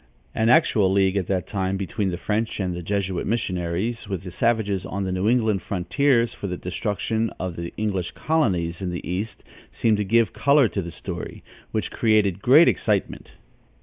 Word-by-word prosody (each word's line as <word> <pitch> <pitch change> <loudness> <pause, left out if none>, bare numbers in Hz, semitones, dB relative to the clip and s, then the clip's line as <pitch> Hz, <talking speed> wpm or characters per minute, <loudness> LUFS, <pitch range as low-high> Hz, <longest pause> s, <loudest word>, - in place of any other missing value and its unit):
An 110 +1 +1
actual 110 - +4
league 95 0 +2
at 95 -4 -1
that 95 -2 -1
time 95 -2 -2
between 100 +1 -2
the 90 - -3
French 110 +4 -2
and 90 -2 -1
the 90 - -5
Jesuit 95 0 -2
missionaries 100 +1 -2
with 95 -2 -3
the 90 - -7
savages 105 -2 0
on 100 +1 -4
the 95 - -2
New 95 +3 +1
England 110 -5 +2
frontiers 120 +6 +1
for 100 - -6
the 90 -1 -4
destruction 110 +4 -2
of 90 -2 -4
the 85 0 -5
English 95 -5 -1
colonies 95 - 0
in 95 - -2
the 90 0 -5
east 100 +5 -4 0.3
seemed 110 -2 +1
to 105 - 0
give 115 +3 +2
color 140 -2 +4
to 100 - -3
the 85 - -6
story, - - -7 0.3
which - - -2
created 105 -4 +2
great 145 +9 +7
excitement. 105 -3 0
100 Hz, 180 wpm, -24 LUFS, 90-110 Hz, 0.3 s, great